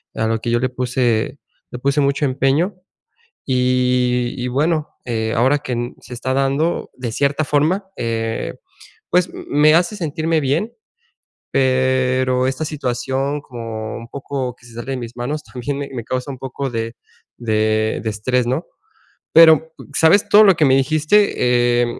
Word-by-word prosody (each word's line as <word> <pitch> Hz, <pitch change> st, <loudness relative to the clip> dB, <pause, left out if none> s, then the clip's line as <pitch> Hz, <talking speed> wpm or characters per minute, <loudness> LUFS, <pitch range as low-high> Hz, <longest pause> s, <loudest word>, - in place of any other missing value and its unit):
a 110 Hz, -, 0 dB
lo 115 Hz, 0 st, 0 dB
que 115 Hz, -, -4 dB
yo 120 Hz, -, +2 dB
le 130 Hz, -, +1 dB
puse, 125 Hz, 0 st, -1 dB, 0.3 s
le 125 Hz, -, -6 dB
puse 140 Hz, +3 st, +1 dB
mucho 140 Hz, +1 st, +1 dB
empeño. 140 Hz, +8 st, +1 dB, 0.7 s
Y 125 Hz, -1 st, +1 dB
y 125 Hz, 0 st, -3 dB
bueno, 155 Hz, +4 st, 0 dB, 0.2 s
eh, 110 Hz, -2 st, -2 dB
ahora 130 Hz, +5 st, +3 dB
que 130 Hz, -4 st, -5 dB
n 120 Hz, +1 st, -3 dB
se -, -, -10 dB
está 130 Hz, +2 st, -2 dB
dando 135 Hz, +5 st, 0 dB
de 125 Hz, -3 st, -5 dB
cierta 140 Hz, +5 st, 0 dB
forma, 155 Hz, +7 st, +1 dB
eh, 115 Hz, -1 st, -2 dB, 0.6 s
pues, 180 Hz, 0 st, +3 dB
m -, -, -9 dB
me 150 Hz, +2 st, +5 dB
hace 175 Hz, +5 st, +2 dB
sentirme 160 Hz, -1 st, -1 dB
bien. 160 Hz, -, -1 dB, 0.8 s
Pero 130 Hz, -1 st, +2 dB
esta 135 Hz, +4 st, -2 dB
situación, 135 Hz, 0 st, -2 dB
como 115 Hz, -4 st, -6 dB
un 115 Hz, -, -9 dB
poco 130 Hz, -1 st, -4 dB
que 120 Hz, -, -22 dB
se 120 Hz, -, -15 dB
sale 120 Hz, +3 st, -5 dB
de 130 Hz, -, -3 dB
mis 120 Hz, -1 st, -7 dB
manos, 145 Hz, +5 st, -3 dB
también 130 Hz, +3 st, -5 dB
me 140 Hz, 0 st, -5 dB
me 120 Hz, -3 st, -4 dB
causa 130 Hz, +4 st, -3 dB
un 130 Hz, -, -9 dB
poco 135 Hz, +1 st, -4 dB
de 115 Hz, 0 st, -3 dB, 0.4 s
de 110 Hz, -1 st, 0 dB
de 110 Hz, -, -1 dB
estrés, 120 Hz, +4 st, 0 dB
¿no? 130 Hz, +7 st, -1 dB, 0.7 s
Pero, 160 Hz, -1 st, +6 dB, 0.2 s
¿sabes? 170 Hz, +5 st, +4 dB
Todo 210 Hz, +1 st, +7 dB
lo 195 Hz, -2 st, +6 dB
que 155 Hz, -, +3 dB
me 135 Hz, -2 st, +5 dB
dijiste, 155 Hz, +6 st, +2 dB, 0.7 s
eh, 120 Hz, -, +2 dB
130 Hz, 165 wpm, -19 LUFS, 120-145 Hz, 0.8 s, Todo